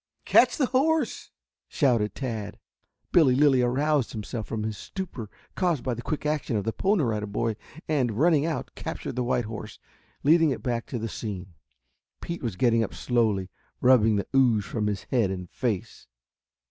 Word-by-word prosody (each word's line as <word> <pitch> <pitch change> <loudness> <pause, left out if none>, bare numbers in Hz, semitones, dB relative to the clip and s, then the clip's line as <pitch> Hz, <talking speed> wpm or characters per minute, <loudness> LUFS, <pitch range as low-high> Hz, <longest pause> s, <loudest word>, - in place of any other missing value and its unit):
"Catch - - +5
the 285 - +3
horse!" 280 +2 0 0.4
shouted 115 - +1
Tad. 110 -5 -4 0.5
Billy 145 -8 +5
Lilly 135 -2 +4
aroused 135 +2 +1
himself 110 +1 -5
from 110 -1 -3
his 110 0 -3
stupor 150 - -6 0.2
caused 175 -8 0
by 130 - -1
the 120 - -5
quick 150 +5 -4
action 150 -5 -1
of 100 - -1
the 110 +2 -2
Pony 195 -4 +1
Rider 105 -3 -1
Boy, 110 +2 -1 0.3
and, 125 -8 0
running 155 0 +4
out, 160 -1 -3
captured - - -6
the 125 - 0
white 120 -1 0
horse, 110 0 -7 0.5
leading 160 +2 +5
it 135 - -3
back 120 -2 -2
to 125 - -4
the 115 0 -3
scene. 95 -4 -6 0.7
Pete 170 0 -5
was 115 -7 -3
getting 115 +2 +3
up 105 - -5
slowly, 110 -6 0 0.3
rubbing 115 -4 +5
the 100 - -1
ooze 120 -6 +4
from 105 -2 -2
his 100 -3 -2
head 115 -7 +2
and 90 -2 -5
face. 110 -7 -3
120 Hz, 170 wpm, -26 LUFS, 105-145 Hz, 0.7 s, Catch